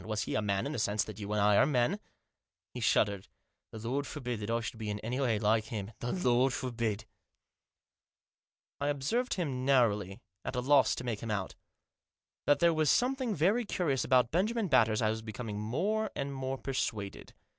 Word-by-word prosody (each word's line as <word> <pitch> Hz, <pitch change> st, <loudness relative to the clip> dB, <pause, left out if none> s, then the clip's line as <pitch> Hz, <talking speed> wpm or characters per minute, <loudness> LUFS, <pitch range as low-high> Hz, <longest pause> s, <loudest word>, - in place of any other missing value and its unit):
Was 110 Hz, -1 st, -2 dB
he -, -, -4 dB
a -, -, +1 dB
man 100 Hz, -2 st, 0 dB
in 140 Hz, -, -2 dB
the 140 Hz, -, -3 dB
sense 105 Hz, 0 st, +1 dB
that 110 Hz, -2 st, -9 dB
you 105 Hz, 0 st, -5 dB
and 105 Hz, -, +1 dB
I 105 Hz, 0 st, +4 dB
are -, -, +6 dB
men? 145 Hz, +8 st, +1 dB, 0.4 s
" -, -, -61 dB
He 125 Hz, -, -5 dB
shuddered. 100 Hz, -4 st, +2 dB, 0.2 s
" -, -, -54 dB
The -, -, -8 dB
Lord 140 Hz, +3 st, -1 dB
forbid 125 Hz, -6 st, -4 dB
that 105 Hz, +1 st, -5 dB
I 115 Hz, 0 st, +1 dB
should 115 Hz, 0 st, -6 dB
be 110 Hz, -1 st, -4 dB
in 105 Hz, 0 st, -3 dB
any 125 Hz, +4 st, -3 dB
way 120 Hz, -5 st, +2 dB
like 110 Hz, +1 st, +2 dB
him; 110 Hz, -2 st, -5 dB
the 120 Hz, -, -3 dB
Lord 130 Hz, -6 st, +2 dB
forbid! 115 Hz, -4 st, -2 dB, 0.6 s
" -, -, -63 dB
" -, -, -40 dB
I 145 Hz, -, 0 dB
observed 145 Hz, -, 0 dB
him 140 Hz, -9 st, -2 dB
narrowly, 105 Hz, -8 st, +2 dB, 0.2 s
at -, -, -4 dB
a -, -, 0 dB
loss 135 Hz, +2 st, +4 dB
to -, -, -6 dB
make 115 Hz, -4 st, -2 dB
him 115 Hz, -, -6 dB
out. 100 Hz, -3 st, -2 dB, 0.9 s
That 145 Hz, -, +5 dB
there 170 Hz, -1 st, +4 dB
was 155 Hz, -2 st, +2 dB
something 255 Hz, -3 st, +2 dB
very 195 Hz, +10 st, +2 dB
curious 165 Hz, -, 0 dB
about 125 Hz, -2 st, +3 dB
Benjamin 210 Hz, +4 st, +1 dB
Batters 110 Hz, -5 st, +4 dB
I 110 Hz, -, +3 dB
was 110 Hz, 0 st, -4 dB
becoming 110 Hz, -1 st, -5 dB
more 205 Hz, -, -1 dB
and 140 Hz, 0 st, -3 dB
more 135 Hz, 0 st, -3 dB
persuaded. 110 Hz, -7 st, -4 dB
125 Hz, 210 wpm, -31 LUFS, 110-145 Hz, 0.9 s, are